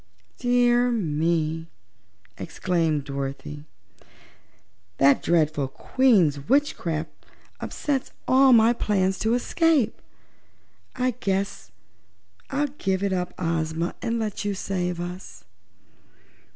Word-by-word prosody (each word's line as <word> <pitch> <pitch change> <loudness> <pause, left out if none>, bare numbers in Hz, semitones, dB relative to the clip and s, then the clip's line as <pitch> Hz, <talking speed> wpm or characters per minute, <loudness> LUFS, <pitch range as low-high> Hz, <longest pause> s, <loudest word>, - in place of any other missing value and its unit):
"Dear 245 0 +3
me!" 165 -5 0 0.7
exclaimed 165 -5 -1
Dorothy, 140 +1 -6 1.3
"that 140 0 +4
dreadful 155 -4 +1
Queen's 180 - +2
witchcraft 185 - 0 0.5
upsets 275 -3 -2 0.2
all 265 +1 +6
my 230 0 +6
plans 195 -4 0
to 225 +2 +1
escape. 310 +1 +1 0.9
I 255 0 +1
guess 195 - -2 0.8
I'll 285 +2 0
give 190 0 0
it 200 -1 0
up, 180 -1 -3
Ozma, 165 0 -1
and 235 0 -1
let 215 -3 -3
you 205 -1 -1
save 180 -3 -2
us." 175 - -7
185 Hz, 95 wpm, -25 LUFS, 160-240 Hz, 1.3 s, all